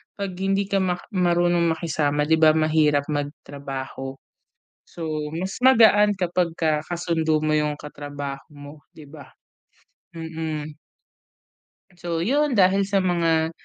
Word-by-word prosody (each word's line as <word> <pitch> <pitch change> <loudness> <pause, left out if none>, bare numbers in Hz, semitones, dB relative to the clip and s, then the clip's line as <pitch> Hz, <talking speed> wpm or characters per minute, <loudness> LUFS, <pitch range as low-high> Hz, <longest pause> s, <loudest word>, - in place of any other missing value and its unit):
pag 200 -2 -4
hindi 195 +1 +1
ka 195 - +2
mak 180 -2 -1
marunong 175 -2 +2
makisama 150 -3 -1
di 160 +2 +2
ba, 155 -1 +7
mahirap 155 -2 +3
mag-trabaho, 140 -2 -5 0.7
so 155 -3 -5
mas 185 +4 -4
magaan 220 -5 +6
kapagka 170 -4 0
ka-sundo 165 -3 0
mo 155 0 0
yung 150 -1 0
katrabaho 145 -1 -7
mo, 145 +1 -11 0.2
di 155 - -14
ba? 145 -1 -13 0.9
Mm. 160 -2 -5 1.2
So 170 -2 -2
yun, 280 +4 +1
dahil 195 0 +3
sa 200 -1 +1
mga 165 -2 +1
160 Hz, 120 wpm, -23 LUFS, 150-180 Hz, 1.2 s, ba